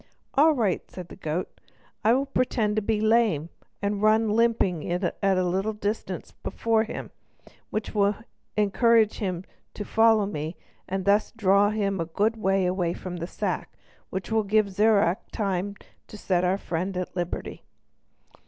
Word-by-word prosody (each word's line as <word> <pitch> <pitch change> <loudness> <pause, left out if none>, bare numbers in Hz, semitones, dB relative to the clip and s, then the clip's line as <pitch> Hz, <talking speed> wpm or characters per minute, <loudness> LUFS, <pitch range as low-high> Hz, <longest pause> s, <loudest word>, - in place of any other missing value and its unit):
"All 310 +3 +5
right," 220 -9 -1
said 180 -2 -9
the - - -10
goat, 165 0 -4 0.4
"I 225 - +5
will 270 +2 +2
pretend 245 -5 0
to 215 - +1
be 215 +1 0
lame, 215 -8 +2 0.3
and 200 0 -1
run 215 0 +4
limping 215 -7 +1
at 175 0 0
a 190 -2 +3
little 190 +4 0
distance 210 +1 -4
before 225 -1 0
him, 220 - -7 0.6
which 215 0 -3
will 205 -1 +2 0.4
encourage 220 +1 +3
him 185 -4 -2 0.3
to 205 - -5
follow 225 -1 +4
me, 160 -4 -4 0.3
and 190 0 -2
thus 205 +2 +3
draw 200 -2 +3
him 200 -3 -1
a 165 - -1
good 210 +7 0
way 190 -4 +1
from 180 -1 -6
his 170 +1 -5
sack, - - -3 0.3
which 190 +3 -5
will 220 0 +3
give 210 0 +2
Zirac 200 -2 +2
time 200 -2 -2 0.3
to 210 - -10
set 185 -3 0
our 185 +2 +2
friend 180 +1 -3
at 180 0 -4
liberty." 175 -1 -4
200 Hz, 155 wpm, -26 LUFS, 185-220 Hz, 0.6 s, All